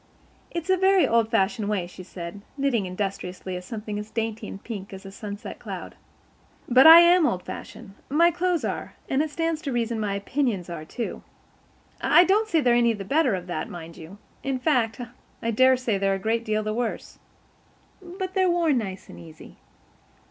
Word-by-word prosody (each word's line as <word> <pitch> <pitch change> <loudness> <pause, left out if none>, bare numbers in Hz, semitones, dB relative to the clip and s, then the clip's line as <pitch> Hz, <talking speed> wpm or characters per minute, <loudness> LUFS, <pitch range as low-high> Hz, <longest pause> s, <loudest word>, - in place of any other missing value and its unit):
"It's 340 +2 -3
a 375 - +4
very 380 0 +4
old 230 -1 +2
fashioned 210 -1 0
way," 200 -4 -1
she 180 +1 -11
said, 180 +1 -8 0.2
knitting 255 -8 0
industriously 185 -1 -4
at 180 - -6
something 210 +1 -5
as 210 +1 -7
dainty 225 -1 -3
and 195 - -9
pink 200 -4 -7
as 190 0 -10
a 195 - -8
sunset 205 +1 -8
cloud. - - -7 0.7
"But 260 +4 +7
I 330 +1 +11
am 345 -2 +5
old 180 -7 -2
fashioned. 220 -5 -9 0.2
My 335 +5 +4
clothes 350 0 0
are, - - -4
and 270 - +1
it 310 - -1
stands 330 +1 -2
to 280 - -4
reason 235 -2 -1
my 205 -2 -1
opinions 200 -4 -2
are, 155 -2 -6
too. 235 +8 -5 0.8
I 350 - +6
don't 410 +4 +2
say 325 -5 +3
they're 245 -3 +3
any 235 -1 +3
the 200 -3 -7
better 280 - +2
of 180 -1 -6
that, 180 - -4
mind 165 -1 -9
you. 170 +4 -11 0.2
In 270 -1 -2
fact, 250 -6 +1 0.4
I 230 - -1
daresay 255 -3 +3
they're 195 0 +1
a - - -2
good 225 +4 -1
deal 215 -1 -1
the 215 0 -2
worse. 235 0 -4 0.8
But 375 +1 -6
they've 375 -2 +2
worn 335 -6 +2
nice 190 -4 -6
and 85 - -12
easy. 80 -2 -13
225 Hz, 190 wpm, -25 LUFS, 195-300 Hz, 0.8 s, I